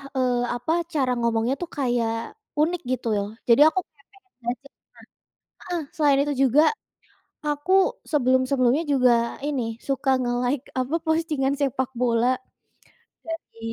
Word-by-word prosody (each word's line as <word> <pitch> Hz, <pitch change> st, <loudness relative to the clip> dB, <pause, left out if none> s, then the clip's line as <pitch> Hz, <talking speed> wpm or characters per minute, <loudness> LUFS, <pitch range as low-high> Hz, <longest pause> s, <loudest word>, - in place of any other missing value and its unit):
eee, 250 Hz, -2 st, +1 dB
apa 245 Hz, +6 st, -3 dB, 0.2 s
cara 265 Hz, -4 st, +1 dB
ngomongnya 235 Hz, +2 st, +1 dB
tuh 350 Hz, -, -4 dB
kayak 235 Hz, -4 st, -1 dB, 0.2 s
unik 345 Hz, +3 st, +1 dB
gitu 255 Hz, -2 st, -2 dB
loh 200 Hz, 0 st, -1 dB, 0.2 s
jadi 235 Hz, +3 st, +6 dB
aku -, -, 0 dB
kayak 280 Hz, -2 st, -30 dB
pengen 390 Hz, -2 st, -25 dB
belajar 245 Hz, +4 st, -4 dB
nah -, -, -71 dB, 0.8 s
heeh, 350 Hz, -1 st, -1 dB, 0.2 s
selain 290 Hz, -3 st, +4 dB
itu 295 Hz, -, -1 dB, 0.2 s
juga, 285 Hz, +5 st, +5 dB, 0.8 s
aku 295 Hz, +5 st, -1 dB, 0.4 s
sebelum-sebelumnya 260 Hz, 0 st, +2 dB
juga 255 Hz, -2 st, +4 dB, 0.4 s
ini 285 Hz, -4 st, -1 dB, 0.3 s
suka 270 Hz, 0 st, 0 dB
nge-like 245 Hz, +2 st, -1 dB, 0.2 s
apa 255 Hz, +5 st, -2 dB
postingan 310 Hz, -4 st, +1 dB
sepak 260 Hz, -2 st, 0 dB
bola, 235 Hz, -1 st, +2 dB, 1.0 s
jadi 330 Hz, -7 st, -7 dB
265 Hz, 130 wpm, -24 LUFS, 245-295 Hz, 1.0 s, jadi